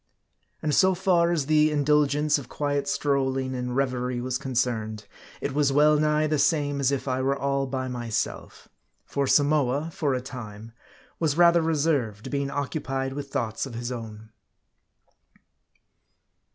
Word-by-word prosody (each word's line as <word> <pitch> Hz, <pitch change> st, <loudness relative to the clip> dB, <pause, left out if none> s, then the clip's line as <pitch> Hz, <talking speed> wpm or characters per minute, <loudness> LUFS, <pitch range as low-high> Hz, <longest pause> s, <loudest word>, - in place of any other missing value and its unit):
And 150 Hz, -1 st, 0 dB
so 190 Hz, +3 st, +4 dB
far 175 Hz, -2 st, +2 dB
as 160 Hz, -5 st, 0 dB
the 155 Hz, +1 st, +4 dB
indulgence 150 Hz, 0 st, +2 dB
of 125 Hz, -, -11 dB
quiet 145 Hz, -1 st, -2 dB
strolling 135 Hz, -2 st, 0 dB
and 125 Hz, -1 st, -3 dB
reverie 125 Hz, -2 st, -1 dB
was 125 Hz, +1 st, -2 dB
concerned, 115 Hz, -5 st, -2 dB, 0.4 s
it 140 Hz, -, -2 dB
was 145 Hz, -1 st, +2 dB
well 150 Hz, +2 st, +4 dB
nigh 150 Hz, 0 st, +2 dB
the 155 Hz, -1 st, 0 dB
same 145 Hz, -2 st, +1 dB
as 135 Hz, -1 st, +2 dB
if 140 Hz, 0 st, -2 dB
I 130 Hz, 0 st, 0 dB
were 135 Hz, +1 st, 0 dB
all 140 Hz, 0 st, -1 dB
by 130 Hz, 0 st, -3 dB
myself. 120 Hz, -3 st, -4 dB, 0.4 s
For 140 Hz, -1 st, -1 dB
Samoa, 145 Hz, +1 st, +2 dB
for 140 Hz, -5 st, 0 dB
a -, -, -1 dB
time, 115 Hz, -4 st, -9 dB, 0.5 s
was 155 Hz, -2 st, 0 dB
rather 170 Hz, -1 st, +6 dB
reserved, 140 Hz, -8 st, 0 dB
being 140 Hz, -1 st, -1 dB
occupied 135 Hz, -2 st, -3 dB
with 140 Hz, 0 st, -6 dB
thoughts 115 Hz, +2 st, -2 dB
of 120 Hz, -, -9 dB
his 120 Hz, +1 st, -4 dB
own. 110 Hz, -2 st, -8 dB
140 Hz, 150 wpm, -26 LUFS, 125-150 Hz, 0.5 s, rather